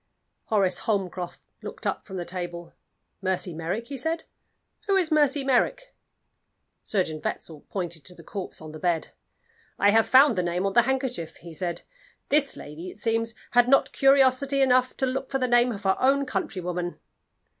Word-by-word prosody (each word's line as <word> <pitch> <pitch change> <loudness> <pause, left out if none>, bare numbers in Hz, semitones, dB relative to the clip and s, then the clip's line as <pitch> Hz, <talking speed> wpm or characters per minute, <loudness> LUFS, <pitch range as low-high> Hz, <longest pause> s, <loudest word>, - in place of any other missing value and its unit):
Horace 195 -4 +1
Holmcroft 185 -4 -3 0.2
looked - - -8
up - - -2
from 190 -2 -6
the 175 - -4
table. 175 -1 -6 0.5
"Mercy 185 -2 0
Merrick?" 170 +8 -3
he 275 +2 -6
said. 320 +4 -1 0.6
"Who 395 - +3
is 360 -4 +2
Mercy 290 -2 +3
Merrick?" - - +1 0.9
Surgeon 160 -7 -1
Wetzel 155 -3 -5
pointed 170 -5 -4
to 180 - -9
the 165 - -14
corpse 190 0 -7
on 155 - -8
the 155 - -9
bed. 170 -2 0 0.7
"I 205 - +4
have 225 +1 +4
found 265 -5 +6
the - - +3
name 175 +2 -1
on 195 - 0
the 240 - +7
handkerchief," 255 -11 -2
he 170 -1 -11
said. 175 +2 -3 0.5
"This 285 -1 +2
lady, 160 +5 -8
it - - -12
seems, 225 +1 0 0.2
had 245 0 +4
not 275 - +4
curiosity 270 0 +4
enough 255 -1 +3
to 265 - +1
look 260 +1 -3
for 270 - 0
the 255 -1 0
name 240 0 +4
of 205 -2 -7
her 190 -1 +3
own 275 +2 +3
countrywoman." 180 -5 -3
210 Hz, 175 wpm, -26 LUFS, 175-265 Hz, 0.9 s, the